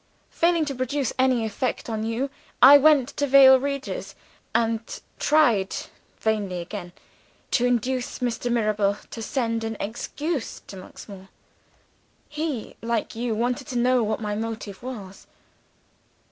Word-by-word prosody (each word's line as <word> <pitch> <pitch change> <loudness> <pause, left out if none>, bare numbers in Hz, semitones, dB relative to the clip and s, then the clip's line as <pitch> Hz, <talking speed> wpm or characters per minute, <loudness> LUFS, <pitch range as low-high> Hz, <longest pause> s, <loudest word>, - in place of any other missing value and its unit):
Failing 335 -1 +2
to 285 - -3
produce 255 +1 -2
any 255 -3 +3
effect 220 +4 -3
on 220 -2 -3
you, 235 +5 -2 0.3
I 285 +2 +10
went 285 -3 +5
to 285 - +1
Vale 265 -1 +8
Regis, 275 +1 -4 0.4
and 225 -1 +2 0.4
tried 240 -11 +3 0.4
(vainly 205 -5 -1
again) 175 0 -7 0.6
to 245 - +3
induce 245 +1 -1
Mr. 245 -1 -2
Mirabel 210 -3 +1
to 230 - -6
send 230 -1 -1
an 225 -1 -4
excuse 275 +6 -4
to - - -10
Monksmoor. 190 +1 -11 1.0
He, 300 -6 -4
like 230 -1 -2
you, 230 -1 -2
wanted 245 +4 -1
to 250 - -3
know 250 +1 +3
what 220 -1 -1
my 210 -2 -3
motive 220 -3 -5
was. 210 -7 -8
235 Hz, 130 wpm, -24 LUFS, 215-265 Hz, 1.0 s, I